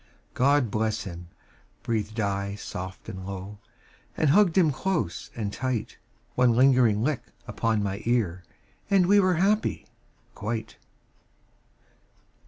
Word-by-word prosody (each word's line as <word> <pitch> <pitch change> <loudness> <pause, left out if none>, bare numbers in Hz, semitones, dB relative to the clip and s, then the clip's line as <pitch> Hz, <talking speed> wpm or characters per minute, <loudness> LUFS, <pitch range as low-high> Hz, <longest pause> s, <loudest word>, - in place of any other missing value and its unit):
"God 135 -3 +3
bless 110 +1 -1
him," 90 -2 -8 0.6
breathed 110 -1 -2
I 100 -1 -1
soft 95 -2 -7
and 95 0 -7
low, 100 +1 -7 0.6
And 155 -3 +3
hugged 195 0 +4
him 165 -5 +5
close 165 - -2
and 105 -3 -3
tight. 130 -2 -3 0.4
One 125 -1 +4
lingering 125 -4 +4
lick 145 -1 0 0.2
upon 110 -2 0
my 100 +1 -3
ear 105 -7 0 0.5
And 195 -3 +4
we 205 +3 +5
were 185 -2 +3
happy 200 +5 +1 0.5
quite. 110 +1 -4
115 Hz, 120 wpm, -26 LUFS, 100-145 Hz, 0.6 s, him